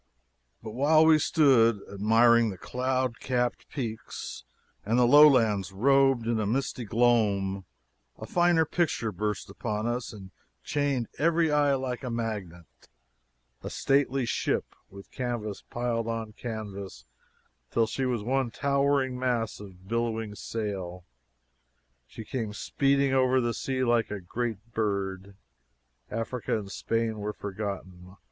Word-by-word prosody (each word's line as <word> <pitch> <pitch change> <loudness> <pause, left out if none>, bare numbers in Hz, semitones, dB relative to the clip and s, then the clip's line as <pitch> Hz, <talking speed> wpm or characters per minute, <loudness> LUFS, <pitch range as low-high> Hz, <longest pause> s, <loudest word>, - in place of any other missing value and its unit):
But 110 - -6
while 150 +6 +4
we 160 -1 +6
stood 130 -9 +4
admiring 115 +3 +4
the 95 - -6
cloud 130 +2 -2
capped 125 -2 -1
peaks 115 -6 -6 0.4
and 115 +4 +1
the 125 - +5
lowlands 120 -8 +6
robed 135 +3 +3
in 110 -3 0
misty 125 -1 -2
gloom 100 -4 +1 0.5
a - - -7
finer 175 -2 +3
picture 155 -9 -1
burst 105 +1 -3
upon 105 +2 -4
us 120 +1 -2
and 95 -4 -11 0.3
chained 140 -5 -1
every 165 0 +3
eye 145 -1 +3
like 130 -1 -4
a 125 - -3
magnet 105 -8 -4 1.0
a - - -6
stately 135 -1 +1
ship, - - -1 0.2
with 100 0 -13
canvas 120 -5 -4
piled 120 -1 -2
on 115 -1 -3
canvas 105 -4 -7 0.6
till 115 - +2
she 130 +4 -2
was 120 -4 -1
one 130 +1 0
towering 140 -1 +1
mass 120 -3 -1
of 95 -2 -13
bellying 115 -1 -2
sail! 95 -5 -5 1.0
She 110 - -10
came 110 -3 -4
speeding 140 +1 +1
over 130 0 +3
the 120 -2 0
sea 130 +2 -2
like 120 -2 +2
a 105 - -4
great 115 +3 -4
bird. 100 -2 -2 0.7
Africa 115 +1 -2
and 100 -2 -7
Spain 115 0 -1
were 105 +1 -3
forgotten. 95 -3 -6
115 Hz, 130 wpm, -28 LUFS, 105-130 Hz, 1.0 s, we